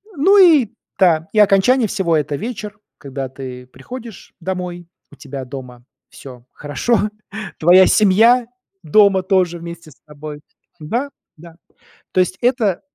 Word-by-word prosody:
Ну 380 +8 +4
и 320 - +6 0.3
да, 165 -4 +3
и 215 - +2
окончание 210 +4 +4
всего 170 -4 0
это 145 -1 -2
вечер, 210 - -6 0.2
когда 135 -1 -6
ты 130 -2 -9
приходишь 225 - -11
домой, 180 -1 -5 0.2
у - - -15
тебя 135 -2 -8
дома 125 -2 -10 0.3
всё 125 -3 -13
хорошо, 210 +9 -1 0.5
твоя 180 +4 +6
семья 225 +4 +4 0.4
дома 195 +3 +4
тоже 180 -3 0
вместе 170 -2 -10
с - - -19
тобой. 150 0 -10 0.4
Да, 240 - -3 0.3
да. 165 0 -14 0.6
То 185 - 0
есть 185 +1 0
это 235 -7 +1
180 Hz, 135 wpm, -18 LUFS, 150-215 Hz, 0.6 s, и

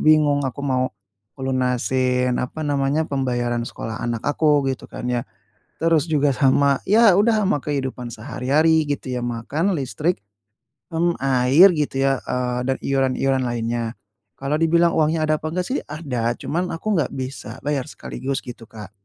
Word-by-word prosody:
bingung 150 -2 +4
aku 130 - -5
mau 130 -2 +1 0.5
ngelunasin, 125 -1 0
apa 155 +5 -4
namanya, 145 +2 +1
pembayaran 120 -3 -1
sekolah 115 -1 -6
anak 115 -2 -2
aku 145 -1 +2
gitu 130 - -8
kan - - -7
ya. 120 - 0 0.6
Terus 165 -1 +3
juga 145 -2 +3
sama, 140 0 +3
ya 215 0 +6
udah 215 +1 +3
sama 185 -6 +1
kehidupan 130 -4 -3
sehari-hari 150 +8 +1
gitu 140 -3 -3
ya, - - -5
makan, 140 - -1
listrik, 145 - -1 0.8
mmm, 170 +1 +1
air, 135 +7 +6
gitu 140 -3 0
ya, 135 -1 +1
eee 125 -1 -1
dan 130 - +1
iuran-iuran 135 0 +1
lainnya. 115 -1 -2 0.4
Kalau 140 +2 -1
dibilang 170 +1 +4
uangnya 155 0 +2
ada 155 0 +2
apa 155 - -3
enggak 180 0 -1
sih 260 - -1
ada, 125 -7 -2
cuman 175 +3 -2
aku 205 +5 -1
nggak - - -4
bisa 130 -3 -6
bayar 145 -3 0
sekaligus 135 -1 -4
gitu, 120 -1 -9
Kak. 105 -3 -10
135 Hz, 155 wpm, -22 LUFS, 125-155 Hz, 0.8 s, ya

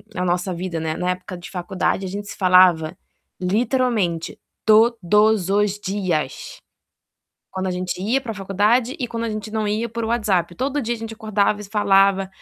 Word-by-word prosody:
a 180 - -1
nossa 180 +1 0
vida, 175 -1 -4
né, 160 0 -2
na 180 - -2
época 185 0 -6
de 175 - -10
faculdade 190 +1 -2
a 185 - -4
gente 205 +1 -6
se - - -8
falava 180 -3 +4 0.4
literalmente 215 -4 0 0.3
todos 215 -3 +4
os 205 0 +1
dias. 185 -9 -3 0.9
Quando 190 0 -3
a - - -1
gente 180 0 -3
ia 245 +7 +1
para 230 -4 -6
faculdade 210 - +1
e 250 - -2
quando 230 0 -4
a 230 - -2
gente 215 -1 -5
não 215 -1 -1
ia 220 +3 -1
por 230 +1 -4
WhatsApp, 205 -7 0
todo 280 +2 -1
dia 235 0 -2
a - - -8
gente 225 0 -7
acordava 210 -1 0
e - - -7
se 200 - -14
falava, 195 -2 +3
200 Hz, 185 wpm, -21 LUFS, 180-220 Hz, 0.9 s, falava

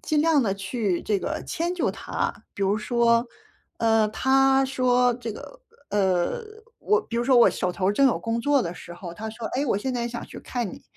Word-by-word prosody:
尽 305 -2 +1
量 315 -4 +4
地 195 -4 0
去 195 -1 -2
这 210 -2 0
个 310 +10 -4
迁 345 +2 -2
就 360 - 0
他， - - -3 0.2
比 200 - -4
如 200 +2 +2
说， 235 +1 +2 0.5
呃， 225 -1 +3
他 270 +3 +3
说 250 -2 +2
这 235 -2 -6
个 - - -10 0.3
呃， 190 - +1 0.4
我 425 +1 +2
比 235 - -6
如 - - +1
说 260 -1 +4
我 240 - +7
手 180 - -2
头 185 +3 0
正 275 +5 +4
有 250 - +2
工 230 0 -2
作 285 +1 +2
的 170 - -4
时 175 -1 -10
候， 175 -1 -8
他 220 +5 -6
说： 225 +1 -6
“哎， 280 - +1
我 215 - +1
现 260 +4 -3
在 240 -1 -2
想 235 - -6
去 - - -10
看 240 -6 -3
你。” - - -11
235 Hz, 230 characters per minute, -25 LUFS, 205-265 Hz, 0.5 s, 我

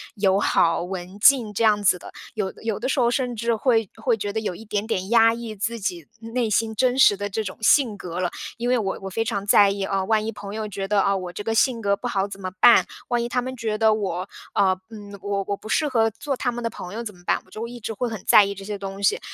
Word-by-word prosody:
友 195 -2 +2
好、 165 -3 +2
文 185 +1 -7
静 240 -2 +5
这 230 - -1
样 210 -1 +3
子 185 - +4
的。 - - -12 0.2
有 195 -3 -2
有 225 -3 -2
的 245 - -2
时 265 0 0
候， 235 - +4
甚 245 -1 -1
至 235 +1 0
会 225 -2 +1
会 225 +1 +1
觉 205 -1 -4
得 220 - -2
有 210 -4 -3
一 225 - -11
点 205 -1 -2
点 190 -4 -2
压 225 -1 +5
抑 230 -2 -6
自 230 +3 -3
己 175 -6 -4
内 230 0 -2
心 220 +2 +1
真 255 +3 +2
实 205 -6 +6
的 205 0 -3
这 220 +3 -2
种 185 -2 -7
性 220 -1 +4
格 180 -2 -6
了。 180 -1 0 0.3
因 240 +1 -2
为 250 - +3
我 195 -4 -2
我 195 - -5
非 225 +4 -2
常 200 -4 -2
在 200 0 +6
意 200 0 -3
“啊， 195 0 -1
万 215 +1 +2
一 225 - -2
朋 205 -1 -8
友 220 -1 -3
觉 195 -1 -5
得， 205 0 +3
哦， 195 0 +2
我 180 -1 -6
这 205 - -6
个 225 +1 -1
性 230 0 +2
格 200 -1 +2
不 245 - -5
好 200 -4 0
怎 200 -1 -9
么 185 -1 -4
办？ 240 - +7 0.2
万 240 -1 +1
一 235 - -2
他 250 +1 0
们 260 +1 -5
觉 220 -2 -2
得 220 0 +4
我 190 -3 -3 0.2
呃， 190 -2 +2
嗯， 205 -2 -10
我 200 0 -2
我 200 - -2
不 215 - -12
适 300 - +1
合 225 -4 +2
做 275 +5 -4
他 245 - -1
们 240 0 -6
的 230 - 0
朋 180 -4 -9
友 230 +2 -4
怎 210 -3 -7
么 175 - -19
办？” - - +1
我 - - -24
就 225 +3 -5
一 240 +1 -9
直 225 - -5
会 245 +4 -2
很 220 -5 -6
在 205 - +7
意 200 - -3
这 195 0 -10
些 205 0 -5
东 195 0 -7
西。 - - +3
210 Hz, 305 characters per minute, -23 LUFS, 195-230 Hz, 0.3 s, 办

